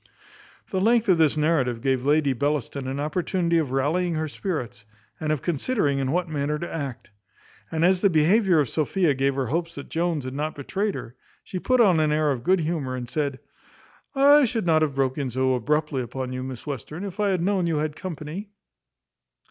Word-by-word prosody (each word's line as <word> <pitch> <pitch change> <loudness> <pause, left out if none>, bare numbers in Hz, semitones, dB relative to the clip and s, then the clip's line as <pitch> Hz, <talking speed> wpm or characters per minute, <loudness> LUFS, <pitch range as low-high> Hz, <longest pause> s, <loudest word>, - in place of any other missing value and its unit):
The 190 - 0
length 230 +2 +3
of 175 -3 +4
this 155 -1 +3
narrative 145 -6 +1
gave 130 0 0
Lady 145 0 +3
Bellaston 140 0 -2
an 135 +1 -3
opportunity 170 +2 0
of 150 -5 -1
rallying 160 +7 0
her 155 0 -1
spirits, 145 - -4 0.4
and 155 -1 -1
of 155 - -1
considering 165 - 0
in 135 -1 -1
what 175 +2 0
manner 150 -1 -1
to 175 - -5
act. 140 -8 -5 0.6
And 160 +1 +1
as 185 0 +3
the 200 - +5
behaviour 180 +3 +4
of 145 - +2
Sophia 160 - +1
gave 135 0 0
her 135 -1 -1
hopes 165 +6 -2
that 140 - -8
Jones 165 -4 -1
had 130 - -5
not 150 +3 -3
betrayed 195 +8 -2
her, 115 - -7 0.3
she 185 - -5
put 255 +6 +1
on 190 -8 +5
an 155 -1 +2
air 150 -1 +2
of 125 -3 -3
good 185 +3 +3
humour, 150 -5 -2
and 125 -1 -5
said, 140 +1 -2 0.8
"I 285 +1 +6
should 225 -4 -2
not 160 -2 +3
have 150 -3 0
broke 135 0 0
in 135 -2 -1
so 130 +2 +1
abruptly 140 +2 0
upon 130 +1 -5
you, 130 - -4
Miss 130 -2 -7
Western, 150 - -6
if 200 0 -7
I 205 -1 +2
had 185 -3 0
known 190 -2 +1
you 165 -2 0
had 150 0 -2
company." 175 +3 -6
155 Hz, 205 wpm, -25 LUFS, 135-180 Hz, 0.8 s, I